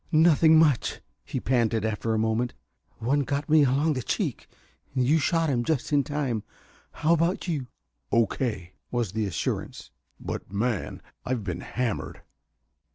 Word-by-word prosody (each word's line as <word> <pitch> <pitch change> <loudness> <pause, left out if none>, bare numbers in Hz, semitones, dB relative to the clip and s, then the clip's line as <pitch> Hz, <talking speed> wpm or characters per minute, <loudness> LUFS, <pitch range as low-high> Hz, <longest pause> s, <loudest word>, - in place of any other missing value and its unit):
"Nothing 160 0 +6
much," 150 -6 +3 0.2
he - - -4
panted, 115 -3 +1
after 110 +1 -1
a - - +1
moment. 110 +2 0 0.4
"One 135 +6 +1
got 140 +1 -1
me 155 -1 +6
along 140 +4 +2
the 130 - -2
cheek - - -2 0.5
you 135 +5 +3
shot 165 +2 +1
him 125 -5 +1
just 150 +1 -1
in 145 -1 +4
time. 140 -7 -2 0.5
How 160 +2 +2
about 170 +4 +1
you?" 145 -7 -2 0.4
"O.K.," 110 -5 0 0.2
was 120 -6 -1
the 110 0 -1
assurance. 90 - -4 0.3
"But, - - -6
man, 110 0 -2 0.2
I've 125 -4 -2
been 90 -3 -4
hammered!" 120 -4 -3
125 Hz, 145 wpm, -26 LUFS, 110-150 Hz, 0.5 s, Nothing